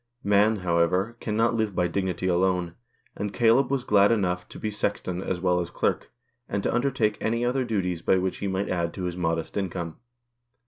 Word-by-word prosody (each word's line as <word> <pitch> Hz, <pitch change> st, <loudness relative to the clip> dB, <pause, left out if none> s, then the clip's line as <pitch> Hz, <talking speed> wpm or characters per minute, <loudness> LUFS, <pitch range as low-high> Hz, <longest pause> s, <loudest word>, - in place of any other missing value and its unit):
Man, 105 Hz, +2 st, +4 dB
however, 90 Hz, +6 st, +1 dB
cannot 115 Hz, +2 st, +1 dB
live 110 Hz, -4 st, -1 dB
by 90 Hz, -, +2 dB
dignity 95 Hz, +1 st, -2 dB
alone, 90 Hz, -1 st, +1 dB, 0.4 s
and 100 Hz, 0 st, -3 dB
Caleb 120 Hz, +4 st, +3 dB
was 135 Hz, -2 st, 0 dB
glad 100 Hz, -1 st, +4 dB
enough 90 Hz, -5 st, 0 dB
to -, -, -10 dB
be 110 Hz, -, -3 dB
sexton 95 Hz, -3 st, -2 dB
as 95 Hz, -2 st, -2 dB
well 90 Hz, -1 st, +2 dB
as 85 Hz, -1 st, -3 dB
clerk, -, -, -1 dB, 0.4 s
and 100 Hz, -1 st, -2 dB
to -, -, 0 dB
undertake 120 Hz, -4 st, +1 dB
any 115 Hz, +2 st, 0 dB
other 130 Hz, +2 st, +1 dB
duties 95 Hz, -7 st, -1 dB
by 95 Hz, -, +3 dB
which 95 Hz, 0 st, -1 dB
he 100 Hz, -, -3 dB
might 95 Hz, +1 st, -1 dB
add 85 Hz, -2 st, -1 dB
to 95 Hz, -, -5 dB
his 90 Hz, -1 st, -2 dB
modest 80 Hz, -1 st, -2 dB
income. 85 Hz, -4 st, -3 dB
95 Hz, 190 wpm, -26 LUFS, 90-110 Hz, 0.4 s, Man